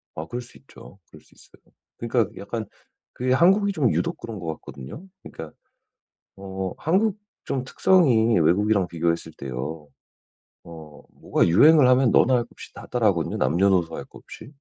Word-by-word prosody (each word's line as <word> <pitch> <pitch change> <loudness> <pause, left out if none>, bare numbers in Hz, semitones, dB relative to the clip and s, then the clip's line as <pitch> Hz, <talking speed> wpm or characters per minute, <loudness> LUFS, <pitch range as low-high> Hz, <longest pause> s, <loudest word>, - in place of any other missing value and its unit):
아 80 - -5
그럴 120 +7 -6
수 120 - -16
있죠. 100 -7 -16
그럴 - - -16
수 - - -26
있어요. - - -23 0.2
그러니까 115 -2 -1
약간 110 +3 -5 0.5
그게 125 +1 -1
한국이 195 +7 +3
좀 140 - +1
유독 85 - -2
그런 115 -3 -8
것 85 - -8
같거든요. 70 - -11 0.2
그러니까 80 -1 -10 0.8
어 95 -1 -5
한국 200 +6 +1 0.3
좀 130 -2 -3
특성이 125 - +3
외국이랑 100 +3 +2
비교했을 85 -1 -2
때요 70 +4 -6 0.8
어 80 -3 -12
뭐가 - - 0
유행을 140 - +6
하면 130 -2 +4
너 - - +5
나 130 0 +2
할 120 - +1
것 - - -21
없이 - - -13
다 - - -11
따라 120 -3 +1
하거든요 85 -5 -1
남녀노소 85 +4 +1
할 - - -7
것 - - -15
없이. 125 - -13
105 Hz, 340 characters per minute, -23 LUFS, 85-130 Hz, 0.8 s, 유행을